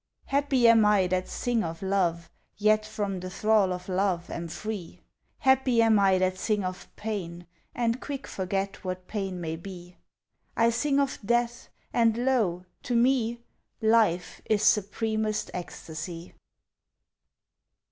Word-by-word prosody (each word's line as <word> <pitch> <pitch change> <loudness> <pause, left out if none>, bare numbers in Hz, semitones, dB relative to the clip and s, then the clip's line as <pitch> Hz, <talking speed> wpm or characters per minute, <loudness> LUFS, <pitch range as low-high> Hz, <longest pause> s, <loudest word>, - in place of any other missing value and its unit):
Happy 275 -3 +2
am 230 -1 +7
I 210 -2 +4
that 185 0 -1
sing 240 -2 0
of 165 +2 -5
love, 175 -3 0 0.3
Yet 215 +1 +3
from 205 -3 -3
the 185 +1 -6
thrall 210 0 +2
of 180 0 -5
love 185 -2 0
am 170 0 -4
free; 205 +1 -6 0.4
Happy 265 -2 +3
am 225 -2 +5
I 195 -1 +4
that 185 0 0
sing 210 -1 0
of 185 0 -5
pain 175 -5 -5 0.3
And 235 +1 0
quick 280 -1 -5
forget 195 +1 -3
what 185 -1 -4
pain 195 -4 -3
may 160 -1 -4
be! 180 0 -10 0.6
I 230 0 +4
sing 280 +4 +1
of 275 -1 0
death 240 +2 0 0.2
and 230 -1 +3
lo! 225 -9 +1 0.2
To 245 - -2
me 235 -1 +2 0.4
Life 220 -6 +2
is 215 -1 +2
supremest 215 +1 +1
ecstacy! 170 0 -7
205 Hz, 135 wpm, -27 LUFS, 185-230 Hz, 0.6 s, am